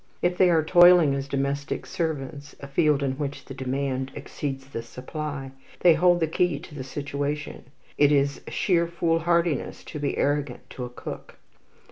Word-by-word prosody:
If 175 Hz, 0 st, +2 dB
they 180 Hz, 0 st, +5 dB
are 165 Hz, -2 st, +4 dB
toiling 175 Hz, -3 st, +7 dB
as 140 Hz, 0 st, -3 dB
domestic 140 Hz, +1 st, -2 dB
servants, 145 Hz, -3 st, -4 dB
a -, -, -8 dB
field 145 Hz, 0 st, +2 dB
in 135 Hz, 0 st, -2 dB
which 145 Hz, -1 st, -4 dB
the 135 Hz, -, -8 dB
demand 130 Hz, 0 st, -2 dB
exceeds 135 Hz, -1 st, -5 dB
the 135 Hz, -4 st, -6 dB
supply, 135 Hz, +3 st, -6 dB, 0.3 s
they 175 Hz, -2 st, +7 dB
hold 175 Hz, +2 st, +3 dB
the 160 Hz, -, +2 dB
key 165 Hz, -1 st, +1 dB
to -, -, -12 dB
the 140 Hz, -3 st, -6 dB
situation; 145 Hz, +2 st, -4 dB, 0.3 s
it 145 Hz, 0 st, +6 dB
is 140 Hz, -1 st, +2 dB
sheer 170 Hz, -3 st, +1 dB
foolhardiness 170 Hz, -2 st, 0 dB
to 150 Hz, -, -7 dB
be 145 Hz, -1 st, -2 dB
arrogant 145 Hz, -3 st, -1 dB
to 125 Hz, -, -5 dB
a -, -, -7 dB
cook. 120 Hz, -, -9 dB
145 Hz, 165 wpm, -25 LUFS, 135-165 Hz, 0.3 s, toiling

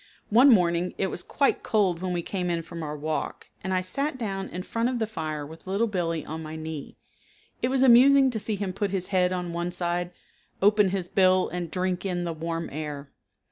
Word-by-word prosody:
One 250 Hz, +6 st, +7 dB
morning 180 Hz, -5 st, +3 dB
it 190 Hz, -, 0 dB
was -, -, -3 dB
quite 280 Hz, +8 st, +1 dB
cold 190 Hz, -6 st, +1 dB
when 185 Hz, -1 st, -2 dB
we 175 Hz, -1 st, -1 dB
came 180 Hz, -1 st, -2 dB
in 170 Hz, -1 st, -1 dB
from 165 Hz, +1 st, -8 dB
our 150 Hz, -1 st, -4 dB
walk, 155 Hz, +1 st, -4 dB
and 190 Hz, -, -3 dB
I 185 Hz, -1 st, +2 dB
sat 275 Hz, +10 st, -2 dB
down 195 Hz, -5 st, -3 dB
in 180 Hz, +1 st, -5 dB
front 230 Hz, +4 st, -1 dB
of 255 Hz, -, -1 dB
the 225 Hz, -, 0 dB
fire 155 Hz, -8 st, -4 dB
with 160 Hz, +4 st, -13 dB
Little 200 Hz, +4 st, +1 dB
Billee 170 Hz, -7 st, -2 dB
on 160 Hz, +1 st, -5 dB
my 155 Hz, 0 st, -7 dB
knee. 160 Hz, -2 st, -7 dB, 0.6 s
It -, -, +2 dB
was 265 Hz, 0 st, +2 dB
amusing 265 Hz, +2 st, +7 dB
to 220 Hz, -, -3 dB
see 215 Hz, +1 st, -2 dB
him 195 Hz, -2 st, -3 dB
put 200 Hz, +1 st, -1 dB
his 190 Hz, -2 st, -3 dB
head 185 Hz, -2 st, +2 dB
on 180 Hz, -2 st, -3 dB
one 170 Hz, +1 st, -2 dB
side, 175 Hz, 0 st, -2 dB, 0.5 s
open 205 Hz, 0 st, +4 dB
his 185 Hz, -2 st, -2 dB
bill 185 Hz, 0 st, +3 dB
and 175 Hz, -1 st, -4 dB
drink 185 Hz, +1 st, -1 dB
in 180 Hz, -2 st, -2 dB
the 170 Hz, -1 st, -2 dB
warm 165 Hz, +1 st, -3 dB
air. 145 Hz, -1 st, -6 dB
180 Hz, 220 wpm, -26 LUFS, 165-205 Hz, 0.6 s, One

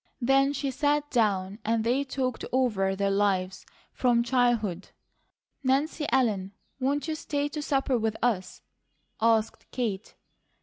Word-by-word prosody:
Then 270 Hz, +2 st, +3 dB
she 280 Hz, -1 st, -2 dB
sat 290 Hz, +2 st, 0 dB
down 200 Hz, -4 st, +1 dB
and 225 Hz, 0 st, +1 dB
they 250 Hz, +5 st, +1 dB
talked 260 Hz, -2 st, -3 dB
over 210 Hz, -7 st, +1 dB
their 200 Hz, 0 st, 0 dB
lives 190 Hz, -2 st, 0 dB, 0.3 s
from 240 Hz, -2 st, +2 dB
childhood. 235 Hz, -7 st, +1 dB, 0.7 s
"Nancy 290 Hz, +3 st, +1 dB
Ellen, 210 Hz, -7 st, +1 dB, 0.3 s
won't 280 Hz, +4 st, 0 dB
you 315 Hz, -, -1 dB
stay 290 Hz, -2 st, -2 dB
to 300 Hz, +1 st, -5 dB
supper 270 Hz, -3 st, +1 dB
with 220 Hz, -1 st, -1 dB
us?" 215 Hz, -7 st, -1 dB, 0.6 s
asked 225 Hz, -1 st, +1 dB
Kate. 220 Hz, -5 st, -3 dB
240 Hz, 130 wpm, -27 LUFS, 205-270 Hz, 0.7 s, Then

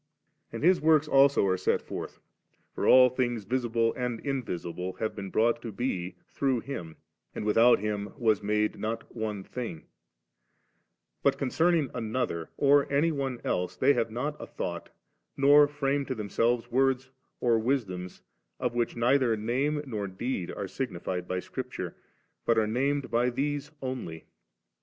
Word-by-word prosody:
And -, -, -6 dB
His 180 Hz, +2 st, +5 dB
works 155 Hz, -1 st, +4 dB
also 140 Hz, -5 st, +5 dB
are 95 Hz, -1 st, +2 dB
set 95 Hz, -, +1 dB
forth; -, -, -7 dB, 0.6 s
for -, -, -1 dB
all 130 Hz, 0 st, +8 dB
things, 120 Hz, -3 st, -1 dB
visible 115 Hz, 0 st, 0 dB
and 125 Hz, -2 st, -2 dB
invisible, 90 Hz, -, -3 dB
have 110 Hz, +4 st, -3 dB
been 100 Hz, -2 st, -6 dB
brought 115 Hz, +4 st, +2 dB
to 115 Hz, -, -6 dB
be 95 Hz, -6 st, -3 dB, 0.2 s
through 130 Hz, -4 st, +1 dB
Him, 85 Hz, -, -6 dB, 0.4 s
and -, -, -4 dB
'without 115 Hz, +3 st, +5 dB
Him 105 Hz, 0 st, -3 dB
was 110 Hz, -5 st, +2 dB
made 105 Hz, +1 st, 0 dB
not 115 Hz, +2 st, -4 dB
one 105 Hz, -3 st, -3 dB
thing^' 115 Hz, -8 st, -6 dB, 1.4 s
But -, -, +2 dB
concerning 160 Hz, +1 st, +1 dB
another 110 Hz, -8 st, -2 dB
or 140 Hz, 0 st, +4 dB
any 150 Hz, +4 st, +3 dB
one 135 Hz, -4 st, -3 dB
else 90 Hz, 0 st, -1 dB
they 140 Hz, +2 st, +4 dB
have 115 Hz, -, 0 dB
not 135 Hz, +7 st, -3 dB
a -, -, -7 dB
thought, 85 Hz, -1 st, -5 dB, 0.5 s
nor 145 Hz, +1 st, +7 dB
firsune 145 Hz, -1 st, -1 dB
to 130 Hz, -, -2 dB
themselves 115 Hz, +3 st, 0 dB
words 130 Hz, +1 st, +1 dB, 0.3 s
or 115 Hz, -2 st, +3 dB
wisdoms, 105 Hz, -8 st, -2 dB, 0.4 s
of 125 Hz, -1 st, -1 dB
which 120 Hz, -1 st, -1 dB
neither 120 Hz, -1 st, +3 dB
name 135 Hz, +7 st, 0 dB
nor 105 Hz, -6 st, -3 dB
deed 95 Hz, 0 st, -3 dB
are 100 Hz, -, -4 dB
signified 90 Hz, -6 st, -4 dB
by 90 Hz, -, -1 dB
Scripture, 125 Hz, -5 st, -6 dB, 0.5 s
but 115 Hz, -, +2 dB
are 110 Hz, -, +4 dB
named 135 Hz, +5 st, 0 dB
by 120 Hz, +2 st, +2 dB
these 145 Hz, +3 st, -2 dB
only. 120 Hz, -12 st, -5 dB
120 Hz, 150 wpm, -28 LUFS, 105-135 Hz, 1.4 s, all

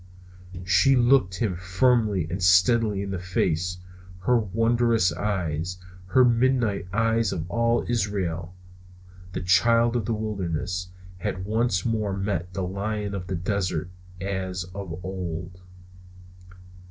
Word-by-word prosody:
She 95 Hz, +9 st, +4 dB
looked 120 Hz, -6 st, +4 dB
him 100 Hz, -5 st, 0 dB
firmly 95 Hz, +1 st, +2 dB
and 90 Hz, +3 st, -4 dB
steadily 100 Hz, +3 st, +4 dB
in 100 Hz, -, -5 dB
the 95 Hz, -, -3 dB
face, 90 Hz, -1 st, -1 dB, 0.4 s
her 120 Hz, +5 st, +3 dB
wondrous 115 Hz, -2 st, +2 dB
eyes, 90 Hz, -3 st, -2 dB, 0.3 s
her 125 Hz, +7 st, +5 dB
midnight 120 Hz, -5 st, +2 dB
eyes 115 Hz, 0 st, +1 dB
of 80 Hz, +1 st, -4 dB
all 115 Hz, +2 st, +1 dB
Israel, 95 Hz, -7 st, -2 dB, 0.8 s
the -, -, -3 dB
child 115 Hz, +6 st, +3 dB
of 115 Hz, -4 st, 0 dB
the 115 Hz, -, -1 dB
wilderness, 90 Hz, -4 st, -3 dB, 0.3 s
had 95 Hz, +2 st, -3 dB
once 110 Hz, -3 st, 0 dB
more 105 Hz, -4 st, -1 dB
met 95 Hz, -3 st, -2 dB
the 95 Hz, -, -1 dB
lion 100 Hz, +2 st, -3 dB
of 90 Hz, -2 st, -5 dB
the 95 Hz, -, -2 dB
desert 90 Hz, -2 st, -2 dB, 0.3 s
as 95 Hz, -1 st, -3 dB
of 90 Hz, -3 st, -6 dB
old. 90 Hz, -1 st, -5 dB
95 Hz, 125 wpm, -25 LUFS, 90-115 Hz, 0.8 s, her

